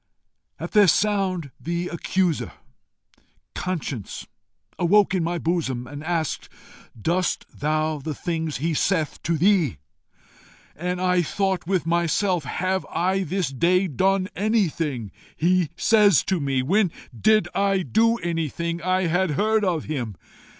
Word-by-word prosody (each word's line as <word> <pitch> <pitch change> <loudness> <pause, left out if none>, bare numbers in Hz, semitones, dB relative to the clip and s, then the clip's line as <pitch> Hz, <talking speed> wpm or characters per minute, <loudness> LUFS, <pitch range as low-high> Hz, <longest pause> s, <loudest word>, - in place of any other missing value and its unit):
At - - -5
their 210 -2 +6
sound 190 -5 +1
the 170 +1 -3
accuser, 175 -1 -1 1.0
Conscience, 150 - -4 0.5
awoke 195 +3 +4
in 185 -3 +1
my 170 +1 -1
bosom, 160 -8 -1
and 145 +3 -8
asked, 165 -1 -2 0.5
'Doest 175 - 0
thou 155 +1 -1
the 150 +2 -5
things 160 -2 -3
he 160 +4 -1
saith 160 0 0
to 165 -1 0
thee?' 175 - +3 1.0
And 180 +3 -3
I 180 -1 +2
thought 190 +1 -1
with 185 -4 0
myself, 170 0 +1
'Have 185 +7 -1
I 190 +2 0
this 185 -2 -1
day 180 +8 +2
done 190 +5 +1
anything 165 - 0 0.2
he 175 -1 +2
says 210 -6 +5
to 190 -2 0
me? 135 -3 0
when 190 +5 +2 0.2
did 215 - +3
I 195 -1 +1
do 230 +5 +3
anything 170 0 -2
I 185 +1 +1
had 180 +2 +1
heard 215 +1 +2
of 175 -6 0
him? 125 -9 -4
175 Hz, 130 wpm, -24 LUFS, 155-190 Hz, 1.0 s, their